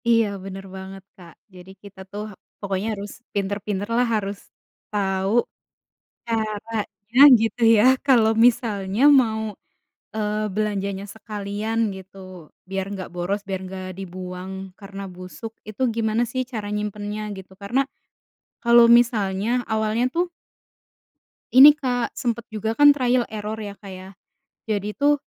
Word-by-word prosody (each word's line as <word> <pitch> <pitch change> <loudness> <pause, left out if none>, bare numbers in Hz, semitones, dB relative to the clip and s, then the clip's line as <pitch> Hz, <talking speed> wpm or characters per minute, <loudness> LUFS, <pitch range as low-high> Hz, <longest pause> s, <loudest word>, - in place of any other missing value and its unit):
Iya, 230 -1 +5 0.2
bener 195 0 -7
banget, 190 0 -9
Kak. 170 -3 -14 0.2
Jadi, 180 +1 -12
kita 200 -1 -13
tuh, 205 +1 -5
ha - - -16 0.3
pokoknya 195 0 -2
harus 200 +1 -7 0.2
pinter-pinterlah, 205 +3 -1
harus 200 -1 -2 0.5
tau 195 -1 0 0.9
caranya, 215 0 -3 0.2
gitu, 225 +2 -2 0.2
ya, 210 - +5 0.2
kalau 230 -5 +5 0.2
misalnya 210 -3 -1 0.2
mau, 220 -2 -2 0.7
eee, 215 0 -1
belanjanya 200 -2 -2
sekalian 210 0 -4 0.2
gitu, 190 +1 -13 0.5
biar 195 0 -2
nggak 190 -2 -6
boros, 180 +4 -2
biar 190 -1 -2
nggak 185 0 -7
dibuang 185 0 -7 0.3
karena 195 0 -8
busuk, 185 +5 -8 0.2
itu 215 +4 -5
gimana, 220 0 +1
sih, 255 - 0
cara 215 -3 -4
nyimpennya, 210 0 -4
gitu, 190 0 -11
karena 240 +7 +1 0.8
kalau 235 0 +7 0.2
misalnya 210 -4 0 0.2
awalnya, 220 +2 +1
tuh 345 +1 +1 1.3
ini, 265 +3 +10
Kak, 250 -4 -2
sempet 235 -3 -2
juga 220 0 -3
kan, 290 0 +8
trial 250 -2 +1
error, 215 0 -5
ya, 205 -2 -6
Kak, 200 -1 -11
ya. 185 0 -9 0.6
Jadi 205 -1 -1
tuh, 290 0 +3
210 Hz, 130 wpm, -23 LUFS, 195-225 Hz, 1.3 s, ini